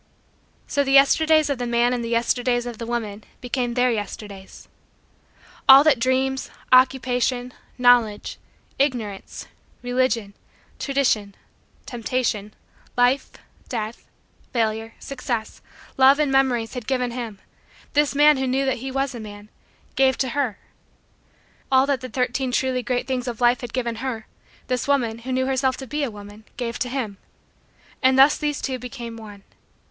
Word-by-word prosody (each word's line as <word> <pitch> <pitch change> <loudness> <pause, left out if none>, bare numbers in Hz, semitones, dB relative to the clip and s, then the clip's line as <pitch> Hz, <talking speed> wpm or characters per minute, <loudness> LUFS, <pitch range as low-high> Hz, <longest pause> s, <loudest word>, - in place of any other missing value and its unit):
So 285 - 0
the 270 -1 0
Yesterdays 310 +3 +5
of 270 - -2
the 245 - -2
man 240 +1 +2
and 245 -1 -2
the 230 - -4
Yesterdays 245 +1 +1
of 240 -2 -7
the 230 - -5
woman 220 -3 -4 0.2
became 245 -1 -2
Their 250 0 +3
Yesterdays. 205 -2 -7 1.0
All 270 +1 +10
that 295 -5 +4
Dreams, 260 +2 0 0.2
Occupation, 250 -1 +2 0.2
Knowledge, 245 -4 +3 0.4
Ignorance, 235 -8 -2 0.4
Religion, 245 -4 0 0.5
Tradition, 245 -8 0 0.5
Temptation, 230 -3 -2 0.4
Life, 245 +3 +3 0.4
Death, 225 -2 -5 0.4
Failure, 225 -1 -1
Success, 245 -5 -5 0.4
Love 270 +1 +6
and 300 -2 +1
Memories 255 -4 +1
had 245 -4 -6
given 250 -2 0
him, 235 -4 -6 0.6
this 290 -1 +2
man 295 0 +6
who 265 0 -1
knew 265 +2 +1
that 265 -2 0
he 265 +3 -6
was 270 +1 -1
a 240 - -7
man, 205 -1 -10 0.5
gave 265 -1 +3
to 260 - 0
her. 255 -5 -1 1.1
All 265 0 +5
that 275 -2 0
the 255 - -6
Thirteen 250 +1 -1
Truly 255 0 0
Great 250 0 -2
Things 255 -1 -3
of 235 -3 -4
Life 245 0 +3
had 245 -2 -6
given 235 -3 -2
her, 230 -3 -4 0.4
this 250 -1 -2
woman 240 -5 +1
who 255 +3 -6
knew 260 0 +1
herself 265 -1 0
to 265 - -7
be 295 +4 -3
a 275 - -1
woman, 205 0 -12
gave 235 -1 -4
to 250 - -1
him. 240 -6 -4 0.8
And 260 -1 +4
thus 275 +2 +7
these 295 -1 -3
two 260 -2 -2
became 245 -2 -7
one. 210 -3 -11
250 Hz, 150 wpm, -23 LUFS, 230-265 Hz, 1.1 s, All